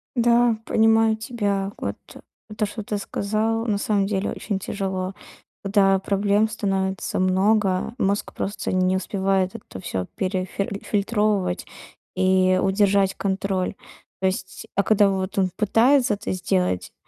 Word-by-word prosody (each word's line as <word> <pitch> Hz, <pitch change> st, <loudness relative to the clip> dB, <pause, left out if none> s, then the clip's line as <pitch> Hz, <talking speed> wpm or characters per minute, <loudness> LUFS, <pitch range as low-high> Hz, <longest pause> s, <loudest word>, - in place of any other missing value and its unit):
Да, 240 Hz, -1 st, +3 dB
понимаю 225 Hz, 0 st, +3 dB
тебя. 205 Hz, -4 st, -2 dB
Вот, -, -, -4 dB, 0.6 s
то 215 Hz, -, +1 dB
что 210 Hz, +1 st, -6 dB
ты 205 Hz, 0 st, -3 dB
сказал, 215 Hz, +3 st, -1 dB
на 210 Hz, -3 st, 0 dB
самом 200 Hz, -1 st, +1 dB
деле 195 Hz, 0 st, -1 dB
очень 200 Hz, -3 st, -3 dB
тяжело. 190 Hz, -1 st, -3 dB, 0.5 s
Когда 195 Hz, -1 st, +3 dB
проблем 200 Hz, +2 st, +1 dB
становится 195 Hz, -3 st, -2 dB
много, 190 Hz, +2 st, +2 dB
мозг 200 Hz, -2 st, -1 dB
просто 200 Hz, -, -3 dB
не 185 Hz, 0 st, +2 dB
успевает 190 Hz, +1 st, 0 dB
это 205 Hz, -, -9 dB
всё 95 Hz, -1 st, -3 dB
перефиль 190 Hz, +1 st, -2 dB
фильтровывать 205 Hz, -3 st, 0 dB, 0.5 s
и 185 Hz, 0 st, +3 dB
удержать 195 Hz, 0 st, +2 dB
контроль. 195 Hz, -1 st, -1 dB, 0.5 s
То 190 Hz, -, +3 dB
есть 190 Hz, 0 st, -4 dB
а 200 Hz, -, +3 dB
когда 205 Hz, -1 st, +4 dB
вот 190 Hz, 0 st, -3 dB
он 190 Hz, -1 st, +2 dB
пытается 245 Hz, +4 st, +3 dB
это 205 Hz, -, -4 dB
сделать, 180 Hz, -, -1 dB
200 Hz, 130 wpm, -23 LUFS, 190-215 Hz, 0.6 s, когда